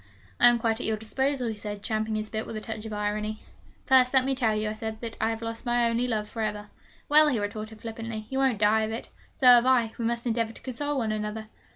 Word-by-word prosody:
'I - - +8
am 240 0 +5
quite 225 0 0
at - - -2
your 220 -1 0
disposal,' 265 +4 -1
he 220 - -4
said, 205 -1 -7
champing 220 -1 -1
his 215 0 -4
bit 220 0 -3
with - - -6
a - - -3
touch 220 0 -6
of 220 - -6
irony. 210 +1 -3 0.4
'First, 260 -1 +5
let 260 -1 +5
me 270 - +1
tell 235 -5 +1
you,' 215 0 -1
I - - -3
said, 220 0 -5
'that 230 -1 -6
I 220 - +2
have 225 0 -4
lost 230 0 -5
my 240 -1 +2
only 235 +2 0
love 215 -3 -1
for 225 - -6
ever.' 210 -1 -3 0.4
'Well,' 305 +1 +6
he 275 -5 +1
retorted 215 +1 -5
flippantly, 225 -1 -6
'you 265 - -1
won't 265 -4 +2
die 215 +1 +3
of 220 0 -2
it. 225 - -6 0.3
So 265 - -2
have 245 0 +8
I. 240 -4 +3
We 230 - -1
must 235 +1 -1
endeavour 230 -1 0
to - - -11
console 290 +3 -3
one 225 -4 0
another!' 215 0 -4
225 Hz, 260 wpm, -27 LUFS, 215-240 Hz, 0.4 s, I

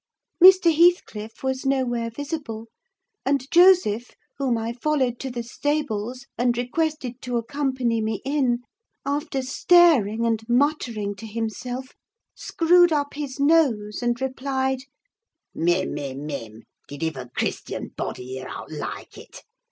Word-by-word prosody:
Mr. 370 -3 +8
Heathcliff 285 - +2
was 265 0 -1
nowhere 250 -4 0
visible; 275 -4 -5 0.6
and 275 -1 +1
Joseph, 345 - +4 0.2
whom 255 -4 +1
I 225 +1 -3
followed 255 -2 0
to 270 - -4
the 240 -1 -4
stables, 255 -2 -2
and 240 -1 +2
requested 260 -1 -2
to 245 -1 -2
accompany 255 -2 -1
me 215 -1 -2
in, 260 -4 +1 0.4
after 280 -1 -2
staring 255 - +4
and 225 -1 +1
muttering 240 -6 +1
to 225 - -8
himself, 230 +4 -4 0.4
screwed 350 +1 +3
up 285 -2 0
his 280 -2 -6
nose 275 -9 +2
and 240 0 0
replied—"Mim! 265 - -3
mim! 140 -1 -5
mim! 115 -7 -7 0.2
Did 145 +3 -7
iver 135 -6 -4
Christian - - -3
body 125 - -5
hear 130 0 -6
aught - - -8
like 150 - -7
it? - - -13
250 Hz, 125 wpm, -24 LUFS, 225-285 Hz, 0.6 s, Mr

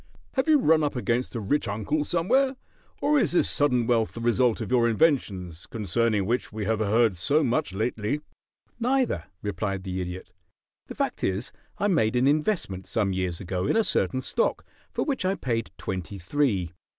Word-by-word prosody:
"Have 265 0 0
you 310 -1 +6
run 160 - +4
up 145 - -1
against 125 +1 -1
a - - -1
rich 130 +8 0
uncle 110 +9 -1
somewhere, 255 - +2 0.5
or 295 0 +3
is 245 - +1
this - - +3
sudden 125 -5 +2
wealth 115 -2 +1
the - - -6
result 120 0 +2
of - - -5
your 120 -2 +4
inventions, 100 - 0
concerning 105 -1 0
which 120 +4 -1
we 105 -1 -4
have 110 +1 0
heard 110 0 +3
so 140 - +2
much 135 +2 0
lately?" 110 +4 -1 0.6
"Neither," 245 - +1 0.2
replied 100 -1 -2
the 95 -1 -3
Idiot. 90 +1 -6 0.6
"The - - -8
fact - - -2
is, 95 +6 -1 0.3
I 205 - +1
made 120 - +2
an 125 +1 +3
investment 145 - 0
some 100 -4 0
years 90 -2 -2
ago 95 0 -2
in - - +2
a 225 - +4
certain 130 -9 0
stock, - - 0 0.2
for - - -2
which 275 -8 -1
I 190 +1 +1
paid 115 -7 -2
twenty 95 +1 -5
three. 95 - 0
115 Hz, 180 wpm, -26 LUFS, 100-150 Hz, 0.6 s, you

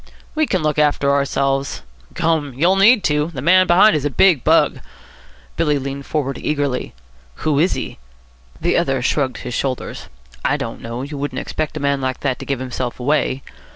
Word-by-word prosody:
"We 310 -1 +1
can 185 -5 0
look 150 0 0
after 145 -1 +2
ourselves." 140 - 0 0.3
"Gum! 160 -5 0
you'll 170 +8 +3
need 205 +2 +5
to. 150 +1 +1
The - - -4
man 185 +3 +5
behind 180 +3 +6
is 150 - -1
a 145 - 0
big 150 0 +4
bug." - - +3 0.8
Billy 150 -3 +2
leaned 140 0 -5
forward 135 -4 -2
eagerly. 145 - -2 0.5
"Who 150 -2 +2
is 175 +5 +3
he?" - - -5 0.6
The 175 - +1
other 135 -7 0
shrugged 130 -1 0
his 125 - -4
shoulders. 130 0 -3 0.4
"I - - +1
don't - - -6
know. 115 +2 -5
You 145 0 -6
wouldn't 140 -2 -4
expect 155 +2 -3
a - - -3
man 140 -1 0
like 130 -1 -3
that 135 -3 -1
to - - -7
give 140 - -1
himself 130 -1 -4
away." 135 0 0
145 Hz, 185 wpm, -19 LUFS, 135-160 Hz, 0.8 s, behind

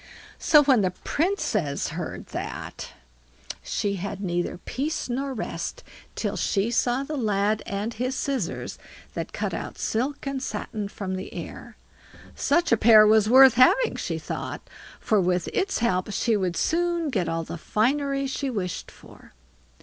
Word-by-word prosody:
So, 300 -2 +6
when 265 -6 +4
the 185 - +2
Princess 210 - -1
heard 160 +2 -5
that, - - -6 0.7
she 200 -1 -2
had 200 +2 -5
neither 175 -3 -2
peace 275 - -3
nor 270 +3 -2
rest 265 - -5 0.3
till - - -2
she 205 +3 0
saw 245 +2 +1
the 300 +2 -5
lad 210 -3 +1
and 205 +4 -3
his 250 +4 -2
scissors 260 -12 -3 0.3
that - - -4
cut - - -3
out - - -5
silk 265 +7 -2
and 275 -1 -2
satin 215 -5 -4
from 195 -2 -5
the 185 - -7
air; - - -8 0.6
such 345 0 +1
a 230 - +5
pair 215 -1 +8
was 215 0 +5
worth 260 0 +9
having, 255 - +4
she - - -3
thought, - - -6 0.3
for 215 -3 +2
with 180 -1 0
its 390 - 0
help 190 -3 0
she 225 +2 +1
would 185 -4 -1
soon 340 - 0
get 175 -9 0
all 165 0 -1
the 165 - -6
finery 275 - 0
she 270 +1 -2
wished 190 -8 -4
for. - - -17
225 Hz, 155 wpm, -25 LUFS, 195-275 Hz, 0.7 s, worth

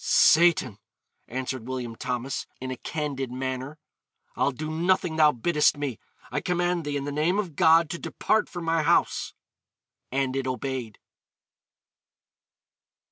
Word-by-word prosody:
'Satan,' 155 - +4 0.5
answered 130 -1 -4
William 125 -3 -4
Thomas, 125 +2 -3
in 130 0 -5
a 130 - -4
candid 140 -3 -4
manner, 130 +3 -4 0.6
'I'll - - +2
do 155 +4 -5
nothing 170 0 +1
thou 155 -1 +6
biddest 150 +4 +2
me; 140 -6 -3 0.3
I - - -1
command 175 -1 0
thee, 145 -1 -1
in 140 - -3
the 145 - -3
name 155 +6 +1
of 185 -8 -2
God, 165 +2 +5
to 170 - -4
depart 215 -1 0
from 175 -2 -6
my 165 0 +2
house.' 165 +3 +1 0.8
And 135 0 0
it 135 -1 -1
obeyed. 130 -4 -4
145 Hz, 135 wpm, -26 LUFS, 130-165 Hz, 0.8 s, thou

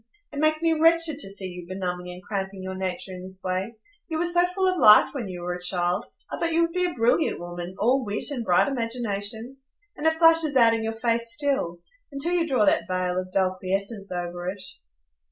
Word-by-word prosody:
It 285 - -5
makes 310 +1 +1
me 330 -1 +3
wretched 325 -1 +4
to 195 - +2
see 195 -1 -4
you 180 -1 -8
benumbing 180 -1 -4
and 180 +1 -10
cramping 195 -1 -5
your 190 0 -5
nature 185 0 -4
in 180 - -8
this 190 0 -8
way. 185 +5 -3 0.3
You 320 - -3
were 340 - 0
so 350 0 +3
full 375 +1 -1
of 370 -1 0
life 210 0 +7
when 250 -7 -4
you 180 -2 -7
were 180 0 -2
a 180 - -7
child; 180 0 +1 0.2
I - - -4
thought 335 - 0
you 335 +1 +3
would 335 0 -2
be 360 0 +1
a 350 - -2
brilliant 240 +6 +1
woman,—all 185 +9 -1
wit 210 +6 -1
and 250 -5 -3
bright 180 -5 +3
imagination. 230 -1 -3 0.4
And 305 - -1
it 320 0 +2
flashes 325 -3 +5
out 230 -3 +6
in 225 -1 -1
your 225 0 -2
face 230 0 0
still, 230 - 0 0.3
until 285 +5 -1
you 340 -2 +1
draw 255 -7 +2
that - - +2
veil 185 -1 -1
of 185 0 -6
dull 185 -1 +1
quiescence 195 +2 -3
over 175 0 -4
it." 190 0 -7
215 Hz, 220 wpm, -25 LUFS, 185-290 Hz, 0.4 s, life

